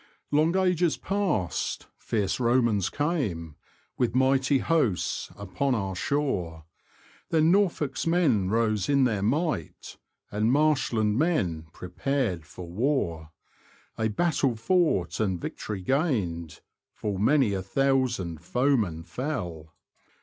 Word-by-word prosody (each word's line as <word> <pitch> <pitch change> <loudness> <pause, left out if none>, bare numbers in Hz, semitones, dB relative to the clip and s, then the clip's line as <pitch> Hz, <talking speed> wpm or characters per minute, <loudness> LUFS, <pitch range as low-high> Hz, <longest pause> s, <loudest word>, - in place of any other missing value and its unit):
Long 155 +5 +3
ages 180 -3 +2
past 190 - -1
fierce 105 -2 -1
Romans 120 -5 +2
came,f 120 - -2 0.5
With 120 -2 +1
mighty 135 +1 +3
hosts, 130 - 0
upon 125 +7 -1
our 95 -4 -2
shore; 90 - -2 0.6
Then 160 0 +3
Norfolk's 175 -7 +1
men 140 - +2
rose, 110 -1 +1
in 140 -1 +4
their 110 -6 +1
might, 140 - -2 0.3
And 105 +3 +1
marshland 130 -7 +2
men 95 - 0
prepared 95 - -2
for 90 +2 -9
war; 85 - -1 0.7
A 110 - 0
battle 135 +1 +1
fought, 115 - +1
and 95 -5 0
victory 100 +1 -5
gained; 90 - -1 0.3
Full 100 -3 -3
many 125 0 +3
a 95 - -1
thousand 120 - 0
foemen 110 - 0
fell. 85 - -5
115 Hz, 110 wpm, -27 LUFS, 95-145 Hz, 0.7 s, in